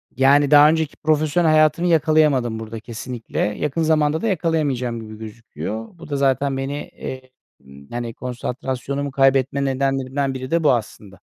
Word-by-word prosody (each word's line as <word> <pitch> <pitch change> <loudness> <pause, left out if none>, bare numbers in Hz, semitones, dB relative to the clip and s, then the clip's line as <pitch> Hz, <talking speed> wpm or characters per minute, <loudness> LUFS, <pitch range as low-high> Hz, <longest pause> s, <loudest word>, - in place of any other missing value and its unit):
yani, 140 +2 +4
daha 150 0 +8
önceki 160 -1 0
profesyonel 155 +2 +1
hayatımı 155 +3 +3
yakalayamadım 150 -8 +2
burada 110 0 -7
kesinlikle. 115 +1 -7
Yakın 135 +9 -1
zamanda 155 -1 +2
da - - -1
yakalayamayacağım 150 - -1
gibi 110 -1 -10
gözüküyor. 110 - -7
Bu 165 -2 -12
da 145 - -2
zaten 135 0 +1
beni, 135 +1 -3
eee, 130 0 -9 0.3
ımm, 70 +1 -15
yani, 120 -1 -4
konsantrasyonumu 130 +3 -4
kaybetme 135 0 +2
nedenlerimden 135 0 -1
biri 130 0 -6
de 170 0 +1
bu 145 - +5
aslında. 105 -4 -5
135 Hz, 150 wpm, -21 LUFS, 120-150 Hz, 0.3 s, daha